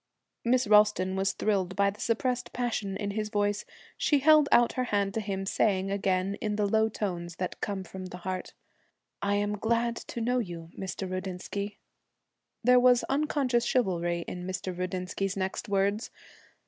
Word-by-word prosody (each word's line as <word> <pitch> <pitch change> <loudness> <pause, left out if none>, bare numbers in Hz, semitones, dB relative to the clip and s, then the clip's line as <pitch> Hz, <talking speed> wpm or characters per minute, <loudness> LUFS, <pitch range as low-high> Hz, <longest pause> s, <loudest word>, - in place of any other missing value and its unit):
Miss 250 +2 +3
Ralston 210 -3 +4
was 195 +1 +1
thrilled 190 -3 0
by 200 +1 +3
the 205 - -12
suppressed 245 +2 -1
passion 220 -5 -2
in 205 -1 -3
his 215 +1 -2
voice. 205 -1 0 0.3
She 295 - +3
held 300 +1 +6
out 240 0 +5
her 255 - -1
hand 200 -3 0
to 220 - -1
him, 195 -2 -3
saying 195 -1 +1
again, 195 0 0
in 210 -2 -1
the 210 0 +1
low 220 +2 +3
tones 175 -5 -4
that 180 +1 -4
come 200 -2 -2
from 185 +1 -8
the 180 - -8
heart, 185 +1 -5 0.7
'I 200 0 +1
am 205 0 0
glad 235 +1 0
I - - +1
know 245 +2 +1
you, 170 -6 -6
Mr. 190 0 -4
Rudinsky.' 185 +2 -4 0.9
There 250 +1 +6
was 245 -1 +5
unconscious 275 -4 +1
chivalry 175 -8 0
in 180 0 -5
Mr. 185 -1 -4
Rudinsky's 185 +2 -3
next 190 +3 -3
words. 200 +2 +1
200 Hz, 165 wpm, -29 LUFS, 185-230 Hz, 0.9 s, held